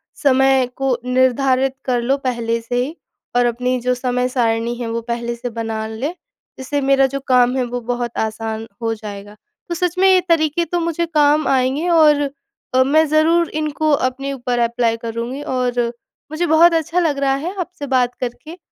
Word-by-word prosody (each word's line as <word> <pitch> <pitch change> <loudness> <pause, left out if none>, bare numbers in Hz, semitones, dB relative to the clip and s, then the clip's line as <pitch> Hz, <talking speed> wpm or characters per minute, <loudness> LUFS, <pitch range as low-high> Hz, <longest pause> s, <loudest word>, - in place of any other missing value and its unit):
समय 265 -2 +3
को 270 -2 0
निर्धारित 260 +1 +2
कर 245 -2 +1
लो 260 +3 +1
पहले 235 -4 -2
से 230 +2 -4
ही 295 +6 -6 0.4
और 245 0 +4
अपनी 250 +2 0
जो 250 +1 +1
समय-सारिणी 245 -2 0
है, 240 -1 -5
वो 230 0 -2
पहले 235 0 -3
से 245 +1 -5
बना 225 -1 -4
लें। 245 +9 -4 0.4
जिससे 275 +2 -2
मेरा 270 0 +4
जो 275 +1 -4
काम 250 -1 +4
है, 255 - +1
वो 245 0 -4
बहुत 240 0 -3
आसान 220 0 -3 0.2
हो 225 -1 0
जाएगा। 205 -1 -9 0.3
तो 345 - -2
सच 355 +1 -1
में, 380 +1 +4
ये 375 -1 +5
तरीके 325 0 +2
तो 350 +1 -2
मुझे 335 0 -1
काम 300 -1 +2
आएँगे 270 +5 +1
और 300 -4 +4 0.5
तो 260 0 +5
मैं 310 +4 +4
ज़रूर 320 +2 +3
इनको 310 0 -1
अपने 275 0 0
ऊपर 245 -2 -2
अप्लाई 235 -1 +1
करूँगी 230 +4 -5
और 250 -2 -1 0.5
मुझे 320 +3 -1
बहुत 335 +2 +6
अच्छा 330 +2 0
लग 320 -5 +1
रहा 275 -1 +2
है, 325 +7 -4
आपसे 350 -5 -5
बात 250 -2 +1
करके 305 +7 -6
260 Hz, 180 wpm, -19 LUFS, 240-300 Hz, 0.5 s, बहुत